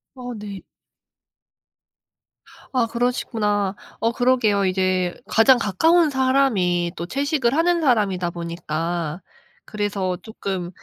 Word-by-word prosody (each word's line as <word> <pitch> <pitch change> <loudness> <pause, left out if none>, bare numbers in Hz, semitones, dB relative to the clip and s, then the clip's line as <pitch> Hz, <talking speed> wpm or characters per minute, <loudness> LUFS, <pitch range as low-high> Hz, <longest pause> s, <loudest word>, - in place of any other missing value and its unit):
어 245 -1 -7
네. 205 -2 -7 2.1
아 250 -3 +2
그러시구나. 220 -4 -1 0.2
어 230 - +1
그러게요. 235 -5 +2
이제 185 -1 0
가장 245 +3 +5
가까운 315 - +3
사람이 250 -11 +2
또 170 - -5
채식을 280 - 0
하는 340 +1 +2
사람이다 205 - +1
보니까 170 0 -4 0.4
그래서 200 -3 -2
쪼끔 190 -3 -5
210 Hz, 225 characters per minute, -22 LUFS, 185-250 Hz, 2.1 s, 가장